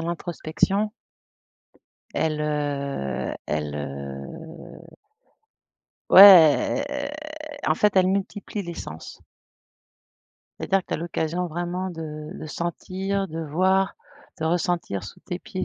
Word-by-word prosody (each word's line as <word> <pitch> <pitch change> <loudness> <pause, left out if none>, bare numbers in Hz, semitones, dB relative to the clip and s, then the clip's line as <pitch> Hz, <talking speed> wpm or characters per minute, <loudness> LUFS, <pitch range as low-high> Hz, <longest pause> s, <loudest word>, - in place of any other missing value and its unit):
l'introspection. 170 +4 -1 1.2
Elle, 155 -1 0
heu 140 - -2
elle 75 -1 -2
heu 75 - -8 1.3
ouais, 185 - +9
elle, 285 0 -3 0.6
en - - +3
fait, 210 -1 +3
elle 185 -1 +4
multiplie 200 +2 -2
les 170 -2 -6
sens 80 - -9 1.4
c'est-à-dire 195 - +2
que - - -40
tu - - -1
as - - 0
l'occasion 170 +1 -2
vraiment 175 +3 -3
de 155 -3 -7
de - - -7
sentir, 190 +5 -3
de 165 0 -5
voir, 185 +5 +1 0.4
de 160 - -3
ressentir 170 - -1
sous - - -10
tes 180 - -5
pieds 185 0 -5
170 Hz, 110 wpm, -24 LUFS, 150-190 Hz, 1.4 s, ouais